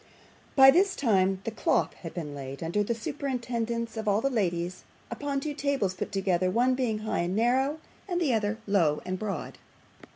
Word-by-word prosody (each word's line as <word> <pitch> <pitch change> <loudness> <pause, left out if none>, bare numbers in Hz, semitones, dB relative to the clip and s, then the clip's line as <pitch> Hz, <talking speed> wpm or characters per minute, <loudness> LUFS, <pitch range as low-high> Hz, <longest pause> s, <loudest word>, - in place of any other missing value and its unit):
By 270 -1 +9
this 380 +6 +3
time 195 -6 +2
the 225 - -3
cloth 220 - +1
had 165 - -9
been 155 -5 -5
laid 140 +1 -7
under 170 +6 0
the 230 +3 0
joint 220 - -12
superintendence 235 -4 -2
of 220 -1 -4
all 205 0 +3
the 275 +4 0
ladies, 180 -5 -1 0.3
upon 285 -1 -2
two 295 +2 -3
tables 280 -9 0
put - - -5
together, 185 -2 +1
one 245 +6 +3
being 250 -4 0
high - - -1
and 175 +2 -1
narrow, 260 +6 +2 0.3
and 355 -2 -1
the 300 -8 +2
other 215 -1 0
low 170 -7 +2
and 185 0 -3
broad. 200 -7 -4
220 Hz, 190 wpm, -28 LUFS, 185-265 Hz, 0.3 s, By